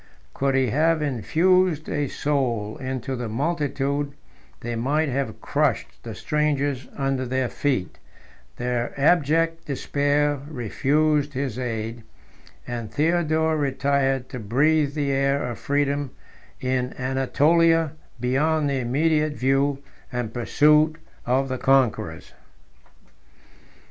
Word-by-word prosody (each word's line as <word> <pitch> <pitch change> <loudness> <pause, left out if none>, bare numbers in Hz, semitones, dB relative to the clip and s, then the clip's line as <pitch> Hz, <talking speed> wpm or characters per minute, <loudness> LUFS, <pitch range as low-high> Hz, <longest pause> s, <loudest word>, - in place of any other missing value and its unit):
Could 135 0 0
he 130 -4 +2
have 155 +3 +2
infused 155 - +2
a 145 -1 -1
soul 120 -8 -1
into 130 0 -4
the 120 -2 -4
multitude, 140 +1 -1 0.5
they 120 0 -4
might 145 +6 0
have 130 -5 -2
crushed - - -1
the - - -7
strangers 145 -3 -1
under 135 -2 0
their 130 0 -1
feet: 130 -8 -2 0.6
their 125 +1 -2
abject 165 +2 +2
despair 145 +1 0
refused 145 +3 +1
his 130 -3 -3
aid; 115 -1 -4 0.6
and 120 -3 -5
Theodore 160 +1 +1
retired 135 -2 0
to 125 - -6
breathe 145 +7 +2
the 145 -2 0
air 140 +1 +1
of 120 -2 -4
freedom 145 0 0 0.5
in 130 -1 -1
Anatolia, 155 +5 +2 0.3
beyond 145 +4 +1
the 135 - 0
immediate 150 +5 +1
view 135 +1 +1 0.3
and 120 -3 -3
pursuit 150 +5 +3 0.3
of 130 +2 +2
the 130 -1 -3
conquerors. 135 -4 +1
140 Hz, 110 wpm, -24 LUFS, 130-150 Hz, 0.6 s, pursuit